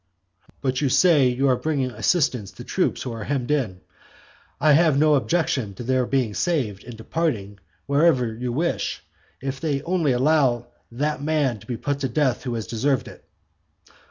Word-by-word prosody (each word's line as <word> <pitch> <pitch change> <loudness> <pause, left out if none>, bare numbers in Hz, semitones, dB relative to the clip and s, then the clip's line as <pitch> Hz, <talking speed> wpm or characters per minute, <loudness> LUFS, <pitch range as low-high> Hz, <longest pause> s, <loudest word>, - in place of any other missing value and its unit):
"But 130 -1 -1
you 140 - +2
say, 150 -2 +5
you 125 +3 +1
are 130 - +4
bringing 135 -2 -1
assistance 125 - 0
to - - -10
troops - - -1
who 125 - -4
are 115 -2 -6
hemmed 135 -1 -2
in. 110 -12 -1 0.8
I 155 - +4
have 155 -1 +4
no 155 +1 +4
objection 130 - 0
to 120 - -7
their 130 0 +1
being 130 -6 0
saved, 125 - -1
and 120 -2 -10
departing 110 -7 -2 0.3
wherever 140 -5 +2
you 120 +2 -4
wish, 165 +7 -2 0.4
if 135 0 -4
they 145 -3 -1
only 170 -4 +1
allow 130 -3 +2 0.2
that 145 +4 -2
man 145 -6 0
to - - -17
be 120 -3 -3
put 145 +3 -2
to 135 -2 -2
death 130 0 0
who 120 -2 -2
has 110 -3 -3
deserved 130 +5 0
it." - - -13
135 Hz, 175 wpm, -23 LUFS, 120-150 Hz, 0.8 s, say